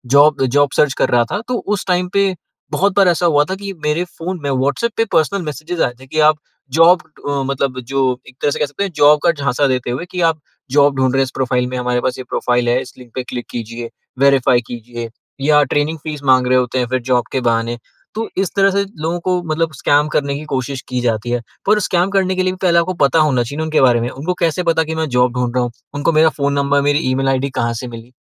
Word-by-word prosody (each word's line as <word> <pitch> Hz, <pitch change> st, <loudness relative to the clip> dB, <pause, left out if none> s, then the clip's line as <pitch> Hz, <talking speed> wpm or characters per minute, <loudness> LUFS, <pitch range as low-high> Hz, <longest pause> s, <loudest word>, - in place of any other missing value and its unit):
Job 145 Hz, -1 st, +5 dB
job 145 Hz, +2 st, +2 dB
search 145 Hz, -3 st, +3 dB
कर -, -, 0 dB
रहा 120 Hz, -1 st, +4 dB
था, 205 Hz, -, -1 dB
तो 250 Hz, -1 st, -1 dB, 0.2 s
उस 200 Hz, -, -6 dB
टाइम 180 Hz, 0 st, +1 dB
पे 200 Hz, -1 st, +2 dB, 0.4 s
बहुत 200 Hz, 0 st, +1 dB
बार 195 Hz, -2 st, +6 dB
ऐसा 175 Hz, 0 st, +2 dB
हुआ 150 Hz, -3 st, +4 dB
था 190 Hz, -, -1 dB
कि 200 Hz, 0 st, -6 dB
मेरे 150 Hz, +3 st, +1 dB
फ़ोन 180 Hz, +1 st, -6 dB
में 140 Hz, -, -1 dB
व्हाट्सऐप 140 Hz, -, 0 dB
पे 225 Hz, -, +2 dB
पर्सनल 195 Hz, +5 st, +2 dB
मैसेज 155 Hz, +3 st, -4 dB
आए 120 Hz, -, +1 dB
थे 130 Hz, -, -13 dB
कि 155 Hz, -, -3 dB
आप 155 Hz, 0 st, +5 dB, 0.3 s
जॉब 165 Hz, +2 st, +5 dB, 0.3 s
अ, 140 Hz, -1 st, 0 dB
मतलब 135 Hz, -1 st, -2 dB
जो 130 Hz, 0 st, 0 dB
एक 125 Hz, -, -18 dB
तरह 145 Hz, -, +1 dB
से -, -, -3 dB
कह -, -, +2 dB
सकते 145 Hz, +7 st, -4 dB
हैं, 195 Hz, -, -3 dB
जॉब 150 Hz, 0 st, +5 dB
का 170 Hz, -, +5 dB
झांसा 140 Hz, -2 st, 0 dB
देते 125 Hz, -2 st, -1 dB
हुए 130 Hz, +8 st, -4 dB
कि 180 Hz, -, -3 dB
आप 155 Hz, -, -13 dB, 0.3 s
जॉब 145 Hz, 0 st, +4 dB
ढूँढ 130 Hz, -1 st, +2 dB
रहे 135 Hz, -, +2 dB
हैं, -, -, +4 dB
इस 130 Hz, -, -5 dB
प्रोफ़ाइल 125 Hz, -1 st, 0 dB
में 125 Hz, -, -4 dB
हमारे 125 Hz, 0 st, 0 dB
पास 125 Hz, 0 st, -1 dB
ये 130 Hz, -, -6 dB
प्रोफ़ाइल 120 Hz, -1 st, 0 dB
है, 125 Hz, +2 st, +2 dB
इस -, -, -10 dB
लिंक 120 Hz, -2 st, -14 dB
पे 130 Hz, -, -2 dB
क्लिक 125 Hz, -1 st, -6 dB
कीजिए, 115 Hz, 0 st, -6 dB, 0.3 s
वेरिफ़ाई 135 Hz, -3 st, +4 dB
कीजिए, 120 Hz, 0 st, -7 dB, 0.3 s
या 150 Hz, +1 st, +4 dB
ट्रेनिंग 145 Hz, +3 st, -1 dB
फ़ीस 150 Hz, -2 st, -6 dB
माँग 130 Hz, -2 st, +4 dB
रहे 130 Hz, 0 st, +4 dB
होते 125 Hz, 0 st, 0 dB
हैं 125 Hz, -, 0 dB
फिर 130 Hz, 0 st, -1 dB
जॉब 120 Hz, -1 st, +3 dB
के 130 Hz, -, -1 dB
बहाने। 115 Hz, 0 st, 0 dB, 0.4 s
तो 225 Hz, +1 st, -2 dB
इस 190 Hz, -2 st, +1 dB
तरह 195 Hz, 0 st, +4 dB
से 200 Hz, +1 st, +1 dB, 0.2 s
लोगों 165 Hz, +2 st, -1 dB
को 180 Hz, +1 st, 0 dB
मतलब 160 Hz, 0 st, -1 dB
स्कैम 145 Hz, +2 st, +2 dB
करने 140 Hz, -1 st, +1 dB
की 145 Hz, -, -6 dB
कोशिश 135 Hz, -2 st, -3 dB
की 125 Hz, -1 st, -1 dB
जाती 115 Hz, -1 st, -1 dB
है। 120 Hz, -, +1 dB, 0.3 s
पर 210 Hz, +1 st, +4 dB
स्कैम 180 Hz, -2 st, +1 dB
करने 190 Hz, -1 st, +1 dB
के 185 Hz, -, +1 dB
लिए 185 Hz, -, 0 dB
पहले 170 Hz, -2 st, +4 dB
आपको 185 Hz, +2 st, -1 dB
पता 140 Hz, +4 st, +2 dB
होना 140 Hz, -6 st, +2 dB
चाहिए 140 Hz, +5 st, -7 dB
ना 160 Hz, -, -1 dB
उनके 155 Hz, -2 st, +1 dB
बारे 120 Hz, -3 st, +4 dB
में। 120 Hz, -, -2 dB
उनको 145 Hz, +8 st, -3 dB
कैसे 170 Hz, +1 st, 0 dB
पता 165 Hz, -1 st, +2 dB
कि 160 Hz, +1 st, -4 dB
मैं 160 Hz, 0 st, -1 dB
जॉब 125 Hz, -1 st, +2 dB
ढूँढ 125 Hz, -1 st, 0 dB
रहा 125 Hz, -, +2 dB
हूँ? 120 Hz, -, -3 dB, 0.2 s
उनको 145 Hz, +3 st, 0 dB
मेरा 160 Hz, +1 st, +5 dB
फ़ोन 140 Hz, -2 st, -1 dB
नंबर, 140 Hz, 0 st, +2 dB
मेरी 145 Hz, +1 st, +2 dB
ई-मेल 135 Hz, +1 st, 0 dB
आईडी 135 Hz, +1 st, 0 dB
कहाँ 120 Hz, -1 st, 0 dB
से 125 Hz, -, -6 dB
मिली? 115 Hz, +1 st, -10 dB
140 Hz, 255 wpm, -17 LUFS, 125-165 Hz, 0.4 s, बार